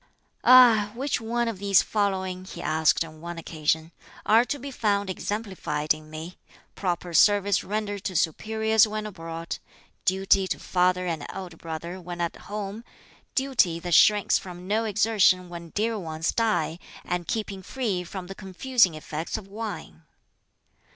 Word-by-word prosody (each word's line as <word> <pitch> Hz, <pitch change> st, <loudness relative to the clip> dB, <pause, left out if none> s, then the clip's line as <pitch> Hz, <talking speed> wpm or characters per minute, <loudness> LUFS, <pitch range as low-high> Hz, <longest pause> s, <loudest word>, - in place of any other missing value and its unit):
"Ah! 240 Hz, -5 st, +7 dB
which 265 Hz, 0 st, -1 dB
one 235 Hz, +1 st, -1 dB
of 225 Hz, -5 st, -4 dB
these 200 Hz, -2 st, +4 dB
following," 190 Hz, -3 st, -1 dB
he 185 Hz, -, -10 dB
asked 160 Hz, +1 st, +2 dB
on 155 Hz, -1 st, -13 dB
one 170 Hz, 0 st, -6 dB
occasion, 160 Hz, 0 st, -1 dB, 0.3 s
"are 225 Hz, +2 st, +6 dB
to 285 Hz, -, -3 dB
be 280 Hz, +1 st, -7 dB
found 200 Hz, -5 st, 0 dB
exemplified 185 Hz, -8 st, -2 dB
in 155 Hz, 0 st, -12 dB
me 160 Hz, +3 st, -8 dB, 0.3 s
proper 175 Hz, -2 st, -3 dB
service 205 Hz, +1 st, +4 dB
rendered 205 Hz, -1 st, -3 dB
to 185 Hz, -, -3 dB
superiors 220 Hz, +7 st, +2 dB
when 215 Hz, 0 st, -4 dB
abroad; 165 Hz, -4 st, -6 dB, 0.4 s
duty 190 Hz, 0 st, +3 dB
to -, -, -2 dB
father 180 Hz, 0 st, +1 dB
and 165 Hz, -4 st, -2 dB
elder 185 Hz, -3 st, -7 dB
brother 165 Hz, +3 st, -6 dB
when 175 Hz, 0 st, -7 dB
at 170 Hz, -1 st, -1 dB
home; 210 Hz, +1 st, -6 dB, 0.5 s
duty 255 Hz, -11 st, +2 dB
that 175 Hz, 0 st, -3 dB
shrinks 205 Hz, +5 st, +5 dB
from 180 Hz, -1 st, -10 dB
no 220 Hz, +3 st, +1 dB
exertion 200 Hz, -4 st, +3 dB
when 170 Hz, -1 st, -8 dB
dear 220 Hz, +4 st, -1 dB
ones 160 Hz, -2 st, -2 dB
die; 215 Hz, -7 st, 0 dB, 0.3 s
and 175 Hz, -1 st, -2 dB
keeping 210 Hz, -4 st, -3 dB
free 200 Hz, -3 st, -2 dB
from 185 Hz, +1 st, -7 dB
the 195 Hz, -, -7 dB
confusing 195 Hz, 0 st, +1 dB
effects 155 Hz, +3 st, -4 dB
of 210 Hz, -3 st, -9 dB
wine?" 200 Hz, -, -7 dB
190 Hz, 150 wpm, -26 LUFS, 170-215 Hz, 0.5 s, Ah